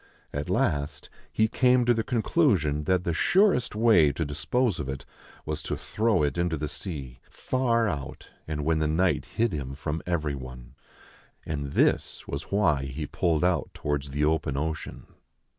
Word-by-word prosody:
At 70 Hz, +1 st, -3 dB
last, 70 Hz, -1 st, -1 dB, 0.2 s
he 110 Hz, -, +2 dB
came 125 Hz, +1 st, +3 dB
to 120 Hz, -, +5 dB
the 115 Hz, -1 st, -1 dB
conclusion 105 Hz, -, +1 dB
that 90 Hz, +1 st, +2 dB
the 85 Hz, -, -1 dB
surest 180 Hz, -, +3 dB
way 105 Hz, -10 st, +5 dB
to 80 Hz, +3 st, -2 dB
dispose 90 Hz, -, 0 dB
of 70 Hz, -2 st, -4 dB
it 65 Hz, 0 st, -5 dB, 0.4 s
was 75 Hz, 0 st, -3 dB
to 75 Hz, -, -3 dB
throw 110 Hz, -6 st, +1 dB
it 75 Hz, +4 st, 0 dB
into 85 Hz, -2 st, 0 dB
the 75 Hz, +1 st, -3 dB
sea, 70 Hz, -6 st, -6 dB
far 120 Hz, -3 st, 0 dB
out, 70 Hz, -9 st, -5 dB, 0.2 s
and 75 Hz, -2 st, -3 dB
when 80 Hz, 0 st, +2 dB
the 80 Hz, -, +1 dB
night 90 Hz, +4 st, +1 dB
hid 115 Hz, -3 st, 0 dB
him 70 Hz, -3 st, -4 dB
from 75 Hz, +3 st, -3 dB
every 75 Hz, -4 st, 0 dB
one. 65 Hz, -2 st, -9 dB, 0.7 s
And 70 Hz, -2 st, -4 dB
this -, -, +1 dB
was 70 Hz, +2 st, -5 dB
why 80 Hz, -10 st, +2 dB
he 70 Hz, +3 st, -4 dB
pulled 80 Hz, +1 st, 0 dB
out 90 Hz, 0 st, +1 dB
towards 70 Hz, -1 st, -2 dB
the 75 Hz, +2 st, 0 dB
open 75 Hz, -3 st, 0 dB
ocean. 80 Hz, +2 st, -4 dB
80 Hz, 170 wpm, -27 LUFS, 70-105 Hz, 0.7 s, to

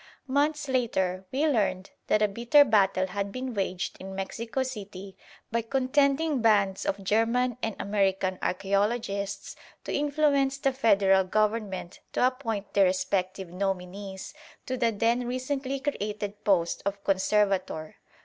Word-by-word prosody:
Months 290 Hz, +2 st, 0 dB
later 190 Hz, -8 st, 0 dB
we 280 Hz, +4 st, +1 dB
learned 200 Hz, -9 st, 0 dB, 0.2 s
that 215 Hz, -, +3 dB
a -, -, +5 dB
bitter 240 Hz, +8 st, +5 dB
battle 195 Hz, -4 st, +3 dB
had 200 Hz, +2 st, -3 dB
been 255 Hz, +1 st, -4 dB
waged 190 Hz, -3 st, -2 dB
in 190 Hz, 0 st, -8 dB
Mexico 225 Hz, +6 st, -3 dB
City 200 Hz, -6 st, -7 dB, 0.4 s
by 230 Hz, +1 st, +1 dB
contending 275 Hz, +4 st, +1 dB
bands 200 Hz, -4 st, +2 dB
of 195 Hz, 0 st, -2 dB
German 230 Hz, +4 st, +2 dB
and 220 Hz, -2 st, -2 dB
American 190 Hz, -2 st, 0 dB
archæologists 200 Hz, +1 st, -1 dB, 0.3 s
to -, -, -4 dB
influence 285 Hz, -2 st, +2 dB
the 270 Hz, -1 st, 0 dB
Federal 195 Hz, -6 st, +4 dB
Government 210 Hz, -2 st, -1 dB
to -, -, +3 dB
appoint 230 Hz, -6 st, -2 dB
their 200 Hz, -1 st, +5 dB
respective 185 Hz, 0 st, -1 dB
nominees 190 Hz, +1 st, -4 dB, 0.3 s
to 260 Hz, -, -2 dB
the 235 Hz, -2 st, +1 dB
then 235 Hz, +3 st, +1 dB
recently 265 Hz, +2 st, -2 dB
created 210 Hz, -6 st, -4 dB
post 175 Hz, -4 st, +2 dB
of 200 Hz, 0 st, -3 dB
Conservator. 195 Hz, -5 st, 0 dB
210 Hz, 130 wpm, -27 LUFS, 195-255 Hz, 0.4 s, a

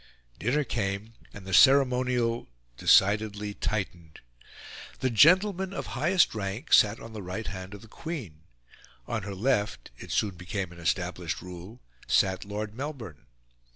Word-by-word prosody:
Dinner 130 Hz, -, +1 dB
came, 105 Hz, -2 st, -3 dB, 0.2 s
and 100 Hz, -2 st, -11 dB
the 95 Hz, -, -6 dB
ceremonial 125 Hz, -, +4 dB, 0.3 s
decidedly 105 Hz, -, +3 dB
tightened. 90 Hz, -8 st, -4 dB, 0.8 s
The 130 Hz, -, 0 dB
gentleman 185 Hz, -, +4 dB
of -, -, -4 dB
highest 165 Hz, +8 st, +3 dB
rank 105 Hz, +1 st, -4 dB
sat 105 Hz, +1 st, +5 dB
on 115 Hz, 0 st, -10 dB
the 110 Hz, -, -6 dB
right 95 Hz, +4 st, -5 dB
hand 95 Hz, +3 st, -7 dB
of 105 Hz, -, -12 dB
the -, -, -13 dB
Queen; 115 Hz, -, -7 dB, 0.6 s
on 110 Hz, -, -3 dB
her 100 Hz, 0 st, -6 dB
left 105 Hz, -, -1 dB
it -, -, -10 dB
soon 100 Hz, -2 st, 0 dB
became 90 Hz, 0 st, -4 dB
an 85 Hz, -, -13 dB
established 85 Hz, 0 st, -2 dB
rule 90 Hz, +5 st, -10 dB, 0.3 s
sat 95 Hz, 0 st, +2 dB
Lord 105 Hz, +1 st, -5 dB
Melbourne. 120 Hz, -, -7 dB
105 Hz, 140 wpm, -28 LUFS, 95-125 Hz, 0.8 s, sat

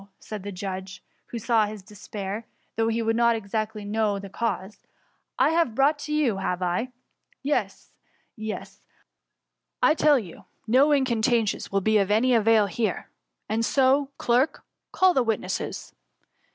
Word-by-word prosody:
^ 200 Hz, -, -18 dB
said 215 Hz, -2 st, -7 dB
the 200 Hz, +2 st, -6 dB
jadge, 190 Hz, 0 st, -6 dB, 0.3 s
who 235 Hz, -, -6 dB
saw 225 Hz, -1 st, +2 dB
his 210 Hz, -2 st, -8 dB
de> 210 Hz, +2 st, -16 dB
qmir, 205 Hz, +2 st, -6 dB, 0.3 s
though 225 Hz, 0 st, +1 dB
he 230 Hz, 0 st, 0 dB
did 225 Hz, 0 st, +1 dB
not 235 Hz, 0 st, +3 dB
exactly 215 Hz, 0 st, -3 dB
know 210 Hz, -1 st, 0 dB
the 195 Hz, -1 st, -8 dB
cause; 210 Hz, -3 st, -3 dB
^* -, -, -40 dB, 0.6 s
I -, -, +4 dB
have 325 Hz, -9 st, +1 dB
brought 295 Hz, +3 st, +2 dB
you 300 Hz, -6 st, +1 dB
to, -, -, -6 dB
have 185 Hz, -1 st, -2 dB
I 175 Hz, 0 st, 0 dB
f 250 Hz, -, -5 dB, 0.6 s
Yes, 290 Hz, +2 st, -2 dB, 0.4 s
yes; 215 Hz, -1 st, -7 dB, 1.0 s
I -, -, +6 dB
tell 300 Hz, -2 st, +4 dB
you, 190 Hz, -9 st, -8 dB, 0.2 s
no 260 Hz, +7 st, +4 dB
incantations 235 Hz, -5 st, +1 dB
will 195 Hz, 0 st, +1 dB
be 215 Hz, +2 st, +3 dB
of 195 Hz, -1 st, +1 dB
any 225 Hz, +5 st, +3 dB
arail 225 Hz, -2 st, +4 dB
hene; 220 Hz, +3 st, -2 dB, 0.4 s
and 225 Hz, +1 st, 0 dB
so, 270 Hz, +3 st, +3 dB
clerk, 250 Hz, +5 st, +1 dB, 0.3 s
call 375 Hz, -1 st, +4 dB
the 265 Hz, -, +3 dB
witnesses. 220 Hz, -5 st, -3 dB
220 Hz, 165 wpm, -25 LUFS, 205-250 Hz, 1.0 s, I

